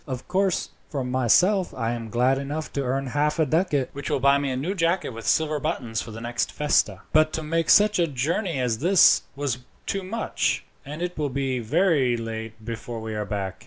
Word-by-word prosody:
Of 130 Hz, -2 st, -5 dB
course, 190 Hz, 0 st, 0 dB, 0.2 s
for 140 Hz, -4 st, -3 dB
myself, 130 Hz, -, +2 dB
I 115 Hz, -2 st, -1 dB
am 115 Hz, -2 st, -5 dB
glad 125 Hz, +4 st, +2 dB
enough 145 Hz, +3 st, -5 dB
to 140 Hz, -, -1 dB
earn 135 Hz, +1 st, -1 dB
half 145 Hz, +4 st, 0 dB
a 160 Hz, -, +3 dB
ducat, 150 Hz, -3 st, +1 dB
which 140 Hz, 0 st, -5 dB
will -, -, +1 dB
buy 140 Hz, +1 st, +4 dB
me 140 Hz, -1 st, -1 dB
a 130 Hz, -, -2 dB
new 160 Hz, +9 st, -2 dB
jacket 175 Hz, 0 st, 0 dB
with 115 Hz, -1 st, -8 dB
silver 155 Hz, -1 st, +2 dB
buttons 125 Hz, -8 st, -2 dB
for -, -, -8 dB
the 110 Hz, 0 st, -8 dB
next 120 Hz, +1 st, -2 dB
festa; 150 Hz, 0 st, +1 dB
but 155 Hz, 0 st, +4 dB
to 160 Hz, -, -3 dB
make 165 Hz, +1 st, -1 dB
such 210 Hz, -2 st, +5 dB
a 170 Hz, -, +3 dB
journey 160 Hz, -, -1 dB
as 120 Hz, -3 st, 0 dB
this 180 Hz, +4 st, +6 dB
was 135 Hz, -3 st, -2 dB, 0.3 s
too 195 Hz, -, -2 dB
much, 215 Hz, +5 st, -1 dB, 0.2 s
and 150 Hz, +5 st, -6 dB
it 180 Hz, 0 st, -3 dB
will 145 Hz, -2 st, 0 dB
be 135 Hz, -1 st, -1 dB
very 135 Hz, -, +2 dB
late 110 Hz, -1 st, -6 dB
before 115 Hz, 0 st, -5 dB
we 110 Hz, 0 st, -5 dB
are 105 Hz, -1 st, -3 dB
back. 100 Hz, -2 st, -4 dB
140 Hz, 210 wpm, -25 LUFS, 120-165 Hz, 0.3 s, this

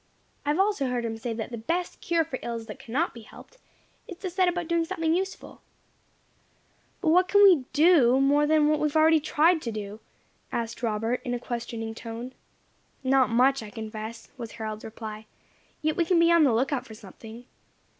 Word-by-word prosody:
I -, -, +2 dB
have 300 Hz, +4 st, +1 dB
also 390 Hz, -9 st, +1 dB
heard 245 Hz, -1 st, -2 dB
him 225 Hz, -1 st, -3 dB
say 225 Hz, +2 st, -5 dB
that 225 Hz, +1 st, -5 dB
'the 235 Hz, -, -5 dB
best 345 Hz, +10 st, -3 dB
cure 335 Hz, -1 st, +1 dB
for 265 Hz, -5 st, -6 dB
ills 230 Hz, -1 st, -5 dB
that 210 Hz, -, -9 dB
cannot 280 Hz, +9 st, -2 dB
be 235 Hz, -, -11 dB
helped 485 Hz, -, -16 dB, 0.5 s
is 360 Hz, -, -9 dB
to 370 Hz, -1 st, -5 dB
set 370 Hz, +1 st, +2 dB
about 350 Hz, -1 st, -1 dB
doing 335 Hz, 0 st, +1 dB
something 325 Hz, -2 st, -1 dB
useful.'" 380 Hz, +2 st, -4 dB, 1.4 s
"But 325 Hz, -, +1 dB
what 365 Hz, +3 st, +4 dB
can 405 Hz, +2 st, +5 dB
we 350 Hz, -10 st, +6 dB
do 295 Hz, -6 st, +5 dB
more 290 Hz, +2 st, +3 dB
than 305 Hz, -1 st, +4 dB
we 305 Hz, 0 st, +2 dB
have 295 Hz, -, -7 dB
already 315 Hz, 0 st, +5 dB
tried 315 Hz, +3 st, +2 dB
to 235 Hz, -, -4 dB
do?" 210 Hz, 0 st, -6 dB, 0.5 s
asked 230 Hz, 0 st, -4 dB
Robert, 225 Hz, +1 st, -1 dB
in 245 Hz, -1 st, -2 dB
a -, -, -4 dB
questioning 230 Hz, -2 st, -5 dB
tone. 230 Hz, +3 st, -7 dB, 0.7 s
"Not 260 Hz, 0 st, +3 dB
much, 255 Hz, +3 st, +3 dB
I 215 Hz, -, -8 dB
confess," 220 Hz, 0 st, -7 dB
was 230 Hz, -2 st, -7 dB
Harold's 215 Hz, -1 st, -6 dB
reply; 220 Hz, -1 st, -8 dB, 0.6 s
"yet 310 Hz, 0 st, +1 dB
we 345 Hz, -, +2 dB
can 345 Hz, +1 st, +2 dB
be 335 Hz, 0 st, +5 dB
on 335 Hz, -2 st, +6 dB
the 265 Hz, -, +3 dB
lookout 260 Hz, +3 st, 0 dB
for 220 Hz, -, -11 dB
something. 220 Hz, +3 st, -12 dB
260 Hz, 195 wpm, -26 LUFS, 225-330 Hz, 1.4 s, we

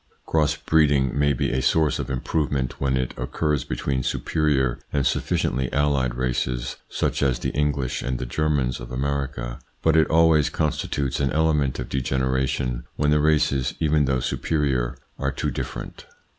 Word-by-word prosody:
Cross 75 Hz, -1 st, +2 dB
breeding 75 Hz, -4 st, +2 dB
may 70 Hz, 0 st, +3 dB
be 65 Hz, -, 0 dB
a 65 Hz, 0 st, 0 dB
source 75 Hz, +2 st, +2 dB
of -, -, -4 dB
improvement 65 Hz, 0 st, -1 dB
when 65 Hz, -1 st, +1 dB
it 65 Hz, -1 st, -2 dB
occurs 70 Hz, +3 st, -1 dB
between 65 Hz, +2 st, -2 dB
superior 70 Hz, -2 st, 0 dB
and 70 Hz, -3 st, 0 dB
sufficiently 65 Hz, +1 st, 0 dB
allied 70 Hz, -4 st, +1 dB
races, 65 Hz, -1 st, -2 dB
such -, -, -1 dB
as 65 Hz, -2 st, +2 dB
the -, -, -2 dB
English 70 Hz, -3 st, -1 dB
and 65 Hz, -1 st, -2 dB
the 65 Hz, -, -4 dB
Germans 70 Hz, -2 st, 0 dB
of -, -, -9 dB
America, 65 Hz, -2 st, -3 dB, 0.2 s
but 80 Hz, 0 st, +4 dB
it 80 Hz, -, +5 dB
always 80 Hz, -2 st, +4 dB
constitutes 75 Hz, -3 st, -1 dB
an 70 Hz, -2 st, +1 dB
element 75 Hz, -3 st, +1 dB
of -, -, -4 dB
degeneration 65 Hz, -1 st, -1 dB
when 75 Hz, 0 st, +1 dB
the 75 Hz, -, +4 dB
races, 75 Hz, -4 st, +2 dB
even 75 Hz, -2 st, +3 dB
though 65 Hz, -1 st, +1 dB
superior, 65 Hz, -2 st, -1 dB, 0.2 s
are 70 Hz, 0 st, 0 dB
too 65 Hz, -, -2 dB
different. -, -, -6 dB
70 Hz, 155 wpm, -24 LUFS, 65-75 Hz, 0.2 s, it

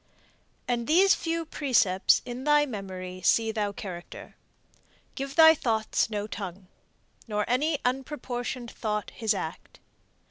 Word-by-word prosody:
And 240 Hz, -1 st, -1 dB
these 380 Hz, +6 st, +5 dB
few 330 Hz, 0 st, -2 dB
precepts 225 Hz, -12 st, +2 dB
in 245 Hz, +1 st, -6 dB
thy 295 Hz, 0 st, +4 dB
memory 185 Hz, -6 st, -7 dB
See 225 Hz, +2 st, +3 dB
thou 210 Hz, -2 st, -1 dB
character: 180 Hz, -4 st, -9 dB, 0.8 s
Give 275 Hz, +1 st, -5 dB
thy 320 Hz, -1 st, +9 dB
thoughts 225 Hz, -7 st, 0 dB
no 210 Hz, -1 st, -3 dB
tongue. 195 Hz, -3 st, -7 dB, 0.6 s
Nor 210 Hz, -1 st, -1 dB
any 290 Hz, +6 st, +1 dB
unproportion'd 250 Hz, -2 st, -3 dB
thought 210 Hz, -2 st, -3 dB
his 220 Hz, -2 st, 0 dB
act. 160 Hz, -4 st, -7 dB
230 Hz, 120 wpm, -27 LUFS, 205-275 Hz, 0.8 s, thy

